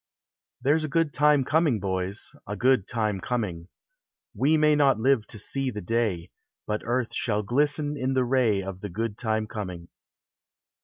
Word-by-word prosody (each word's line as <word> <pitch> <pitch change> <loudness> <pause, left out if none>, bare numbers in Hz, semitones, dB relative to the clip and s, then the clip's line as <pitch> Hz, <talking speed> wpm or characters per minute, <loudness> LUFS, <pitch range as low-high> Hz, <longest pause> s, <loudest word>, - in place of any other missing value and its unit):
There 145 +4 +3
's - - -4
a - - -1
good 155 0 +1
time 150 -2 +4
coming, 155 -6 +2
bo; 95 -1 -1 0.5
A 105 - -3
good 125 -5 +3
time 110 -4 -1
coming: 100 -8 -3 0.7
We 155 +4 +3
may 150 0 +4
not 140 -6 +3
live 125 -2 +2
to 110 - -7
see 135 +5 -2
the 105 -4 -5
day, 100 -4 -1 0.3
But 105 0 -2
earth 120 0 -1
shall 105 -2 -1
glisten 145 +5 0
in 130 -1 -1
the 130 -1 +2
ray 120 -6 +2
Of 95 -1 -7
the 105 - -5
good 110 +3 -3
time 110 -1 -1
coming. 90 -6 -6
120 Hz, 170 wpm, -26 LUFS, 105-140 Hz, 0.7 s, time